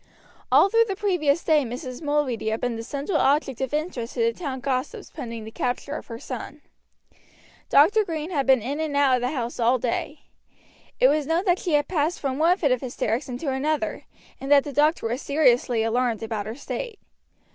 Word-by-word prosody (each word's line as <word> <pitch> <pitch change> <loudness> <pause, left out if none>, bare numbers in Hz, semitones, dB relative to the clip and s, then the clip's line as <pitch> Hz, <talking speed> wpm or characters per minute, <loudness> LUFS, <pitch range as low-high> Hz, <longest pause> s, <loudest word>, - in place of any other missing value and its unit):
All - - +6
through 460 +3 +4
the 390 - -2
previous 350 -7 +1
day 310 -3 +3
Mrs. 250 +2 -6
Mulready 290 -7 0
had 220 +1 -1
been 245 -1 -1
the 225 - -5
central 280 - -2
object 275 -3 +1
of 265 - -2
interest 295 -6 -3
to - - -1
the 460 0 +2
town 280 - -5
gossips 275 - -3
pending 230 -6 -6
the 220 - -9
capture 250 +4 -3
of - - -7
her 230 - -7
son. 260 +4 -7 1.1
Dr. 410 +10 +5
Green 325 -2 -4
had 280 -6 -1
been 260 -4 +4
in 280 +5 -3
and 305 -3 -1
out 270 -3 +4
of - - -5
the 250 - 0
house 245 -4 -4
all 240 +2 +3
day. 255 +5 -3 0.8
It - - +6
was 300 - +1
known 335 +4 +1
that 360 -1 +2
she 345 - -2
had 290 0 +3
passed 325 -1 0
from 270 -1 -2
one 340 +3 +4
fit 290 -8 +1
of 255 - +1
hysterics 250 0 -2
into 255 +3 -3
another, 300 +4 -2 0.3
and 270 +1 -5
that 285 -1 +7
the 290 - -7
doctor 295 -3 +2
was 240 +5 -3
seriously 250 -5 +2
alarmed 230 -1 0
about 215 -2 -3
her 220 - -5
state. 430 - -5
280 Hz, 205 wpm, -24 LUFS, 245-315 Hz, 1.1 s, that